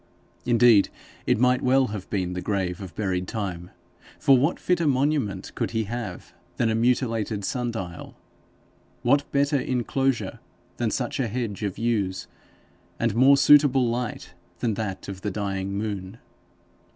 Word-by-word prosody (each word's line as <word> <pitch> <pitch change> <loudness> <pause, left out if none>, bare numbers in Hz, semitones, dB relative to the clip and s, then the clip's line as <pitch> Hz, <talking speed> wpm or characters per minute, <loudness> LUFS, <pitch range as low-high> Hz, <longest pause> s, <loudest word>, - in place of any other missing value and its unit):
Indeed 120 -4 +5 0.4
it - - +3
might 125 +2 +3
well 130 0 +3
have 100 -3 -6
been 90 -3 -2
the 90 - -4
grave 95 -2 -2
of 90 -4 -9
buried 95 -3 -1
Time, 90 -5 -4 0.5
for 135 - +5
what 140 +7 +1
fitter 175 -3 +1
monument 130 -8 0
could - - -2
he 110 - +1
have 110 -4 -6 0.2
than 115 -2 +2
a - - +1
mutilated 115 -3 0
sun 125 +2 -2
dial, 90 -7 -7 0.9
what 140 +4 +2
better 140 0 +2
enclosure 130 0 -1 0.4
than 120 -2 0
such 120 +3 -2
a 130 - +1
hedge 115 -3 -4
of 100 -3 -3
yews, 105 -5 -1 0.7
and 115 -2 +1
more 135 +5 +6
suitable 140 -3 +5
light 120 -5 -4 0.2
than 115 -3 -1
that 100 -3 -4
of 95 -1 -7
the 105 - -2
dying 100 -1 -3
moon? 100 -1 -4
115 Hz, 150 wpm, -25 LUFS, 100-125 Hz, 0.9 s, more